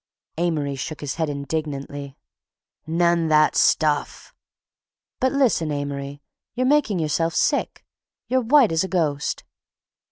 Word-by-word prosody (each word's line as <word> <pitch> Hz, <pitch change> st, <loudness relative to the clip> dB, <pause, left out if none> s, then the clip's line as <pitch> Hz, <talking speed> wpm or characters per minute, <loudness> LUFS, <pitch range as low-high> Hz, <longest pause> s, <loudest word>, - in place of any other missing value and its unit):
Amory 155 Hz, -5 st, -1 dB
shook 145 Hz, +3 st, -6 dB
his 145 Hz, -2 st, -3 dB
head 160 Hz, -, 0 dB
indignantly. 140 Hz, -1 st, -5 dB, 0.7 s
"None 170 Hz, 0 st, +2 dB
that 155 Hz, -1 st, +4 dB
stuff!" 150 Hz, -2 st, +1 dB, 0.9 s
"But 260 Hz, -, +2 dB
listen, 245 Hz, -, +1 dB
Amory, 140 Hz, 0 st, -5 dB, 0.3 s
you're 255 Hz, +1 st, 0 dB
making 265 Hz, -7 st, +2 dB
yourself 165 Hz, +1 st, 0 dB
sick. -, -, 0 dB, 0.4 s
You're 260 Hz, 0 st, +1 dB
white 250 Hz, -, +4 dB
as 165 Hz, +2 st, +1 dB
a -, -, -3 dB
ghost." 155 Hz, -6 st, -1 dB
160 Hz, 120 wpm, -23 LUFS, 145-180 Hz, 0.9 s, that